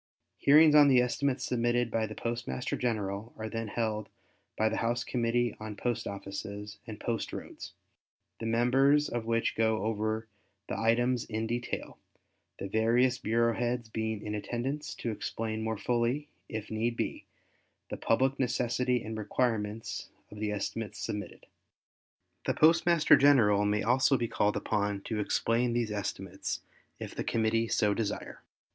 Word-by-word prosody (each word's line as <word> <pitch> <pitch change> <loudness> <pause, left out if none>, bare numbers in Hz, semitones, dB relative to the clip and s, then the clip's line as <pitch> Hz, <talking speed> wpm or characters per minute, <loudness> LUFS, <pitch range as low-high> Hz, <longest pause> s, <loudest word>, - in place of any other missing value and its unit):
Hearings 150 +2 +7
on 150 -1 +8
the 130 -3 +6
estimates 130 +2 0
submitted 120 -1 +1
by 110 0 0
the 110 - -8
Postmaster 120 +3 -3
General 110 -3 -2
are 110 - -4
then 115 0 -4
held 110 -1 -2 0.5
by 110 - +3
the - - -1
House 115 +1 0
Committee 120 -1 0
on 110 -1 -6
Post 120 +2 -2
Offices 100 +1 -6
and 110 -2 -7
Post 115 -1 -2
Roads, - - -8 0.7
the 115 - -3
members 135 +6 +3
of 115 -1 -3
which 115 0 +1
go 110 -2 +1
over 110 0 -1 0.4
the - - -2
items 120 +2 +2
in 110 0 -3
detail, 120 +1 -4 0.6
the 100 - -5
various 120 +4 +2
bureau 115 +1 +2
heads 120 -1 -2
being 110 -1 -3
in 105 - -3
attendance 120 +7 -3
to 115 - -3
explain 110 +1 -3
more 110 0 -2
fully, 120 +7 0 0.2
if 110 -1 -5
need 115 +2 -1
be, - - -3 0.7
the - - -2
public 130 +4 +1
necessity 125 -1 +1
and 110 0 -5
requirements 110 0 -2 0.2
of 105 - -9
the 105 -1 -1
estimates 105 +1 -4
submitted. 105 +1 -5 1.0
The - - +1
Postmaster 165 0 +5
General 110 -8 +5
may 105 0 +1
also 130 +3 +3
be 120 - -1
called 105 -1 +1
upon 105 -2 -1
to 110 +1 -3
explain 115 +3 +1
these 120 -2 0
estimates 100 -2 -4 0.4
if - - -7
the - - -3
Committee 115 0 +1
so 105 -2 +2
desire. 105 -1 -4
115 Hz, 150 wpm, -30 LUFS, 110-120 Hz, 1.0 s, on